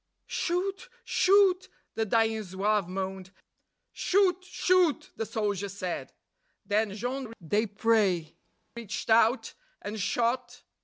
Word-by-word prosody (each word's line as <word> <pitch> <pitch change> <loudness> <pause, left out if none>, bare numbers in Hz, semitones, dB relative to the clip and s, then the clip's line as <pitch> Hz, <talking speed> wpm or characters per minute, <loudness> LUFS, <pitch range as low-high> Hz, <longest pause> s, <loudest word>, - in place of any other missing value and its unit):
"Shoot! 380 +3 -2
Shoot!" 385 -1 +4 0.2
the 225 -1 -1
dying 225 0 +2
Zouave 200 0 0
moaned; 190 0 -4 0.6
"Shoot! 370 -1 +2
Shoot!" 360 -4 +2
the 225 - -3
soldiers 200 -2 -2
said. 180 -3 -4 0.5
Then 210 -1 0
Jean 250 +2 -4 0.2
Desprez 205 -4 +1 0.4
reached 230 -1 -5
out 230 +3 +4 0.3
and 215 +1 -6
shot 245 +3 -1
225 Hz, 100 wpm, -28 LUFS, 200-270 Hz, 0.6 s, Shoot